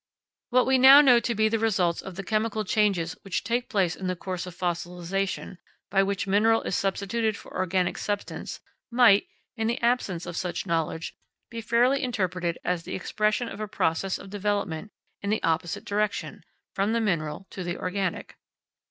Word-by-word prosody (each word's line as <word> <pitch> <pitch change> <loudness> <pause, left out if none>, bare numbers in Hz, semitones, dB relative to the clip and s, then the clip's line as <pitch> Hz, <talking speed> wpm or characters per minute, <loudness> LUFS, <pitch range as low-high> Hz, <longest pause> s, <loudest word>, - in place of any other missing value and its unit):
What 250 0 +4
we 265 0 +3
now 265 +2 +10
know 250 -4 +6
to 235 0 -2
be 220 +1 +3
the 225 +1 0
results 185 -6 +1
of 190 -2 -9
the 195 - -5
chemical 215 +1 -1
changes 190 -5 +1
which 195 -2 -3
take 240 +4 -1
place 190 -8 +1
in 190 - -5
the 185 - -1
course 185 0 -5
of 180 - -9
fossilisation, 180 +2 -3 0.3
by 195 - +4
which 195 0 -1
mineral 215 +3 +3
is - - -2
substituted 200 +3 -1
for - - -13
organic 185 -1 0
substance, 205 -1 -4 0.3
might, 235 -5 +5 0.3
in 225 -2 -1
the 235 +2 -1
absence 235 -8 0
of 175 -1 -6
such 180 +1 -3
knowledge, 165 -1 -2 0.4
be 230 -1 -5
fairly 240 +5 +3
interpreted 185 -9 -1
as 180 -1 0
the - - -6
expression 215 +5 0
of 215 - -8
a 215 - -3
process 185 0 0
of 195 - -12
development 205 -2 -2 0.3
in 200 - -3
the 215 - 0
opposite 165 +1 -1
direction 210 0 -2 0.3
from 200 +3 0
the 230 - +2
mineral 170 -5 -1
to 185 - -5
the 175 0 -3
organic. 185 -1 -3
200 Hz, 180 wpm, -26 LUFS, 180-225 Hz, 0.4 s, now